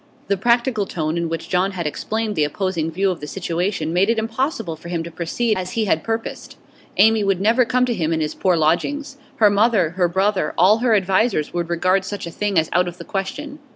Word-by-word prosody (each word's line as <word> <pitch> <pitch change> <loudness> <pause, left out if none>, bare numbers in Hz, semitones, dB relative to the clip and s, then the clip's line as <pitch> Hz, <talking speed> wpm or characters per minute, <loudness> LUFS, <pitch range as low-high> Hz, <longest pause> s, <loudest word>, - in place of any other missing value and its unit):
The 200 - +3
practical 235 0 +1
tone 155 -1 -2
in 170 -1 -1
which 165 -1 -4
John 190 +2 +1
had 175 -3 -4
explained 215 +7 -2
the 155 - +2
opposing 165 +1 -1
view 190 +4 0
of 175 - -5
the 150 - -7
situation 175 -1 -2
made 190 +4 +3
it 230 - +2
impossible 225 - -2
for 165 +2 -11
him 170 -2 -2
to 170 - -8
proceed 195 +8 -1
as 185 0 -5
he 225 -1 0
had 160 -5 +1
purposed. 225 0 -4 0.4
Amy 220 +2 +5
would 195 -2 +1
never 230 +5 +3
come 250 +1 +2
to 245 - -1
him 165 -6 -1
in 160 - 0
his 155 -1 -2
poor 185 -2 +1
lodgings; 275 - 0 0.2
her 210 -2 +5
mother, 205 -5 +3
her 180 0 +1
brother, 190 -1 0
all 200 +6 +5
her 235 -2 +3
advisers 195 -3 +1
would 175 -1 -2
regard 185 +3 +2
such 200 0 -5
a 170 - -6
thing 205 +1 -1
as 160 0 +3
out 180 +1 +3
of 175 0 -6
the 170 - -9
question. 285 +10 -5
190 Hz, 225 wpm, -21 LUFS, 170-220 Hz, 0.4 s, Amy